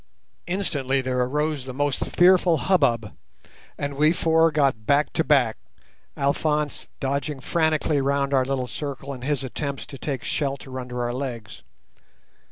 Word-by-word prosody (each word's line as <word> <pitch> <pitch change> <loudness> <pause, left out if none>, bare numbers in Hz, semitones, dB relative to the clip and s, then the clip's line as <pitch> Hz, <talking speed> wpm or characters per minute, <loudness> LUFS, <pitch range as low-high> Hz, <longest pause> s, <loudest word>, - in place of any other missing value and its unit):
Instantly 150 -8 -1
there 130 -1 -1
arose 145 +2 0
the 130 -1 -7
most 145 -1 0
fearful 180 -2 +5
hubbub, 125 - +1 0.6
and 140 0 -3
we 150 +2 +4
four 165 -1 +3
got 135 -8 +1
back 145 +1 +3
to 160 - +1
back, 130 -8 +3 0.6
Alphonse 150 +1 0
dodging 140 +1 -2
frantically 155 0 +1
round 140 0 0
our 130 -1 +4
little 130 -1 -1
circle 140 +3 -5
in 130 - -9
his 140 +1 -1
attempts 135 -1 -4
to 140 -3 -10
take 135 -5 -3
shelter 135 -2 -3
under 125 -1 -4
our 120 0 -2
legs. 125 -4 -5
140 Hz, 145 wpm, -24 LUFS, 130-150 Hz, 0.6 s, fearful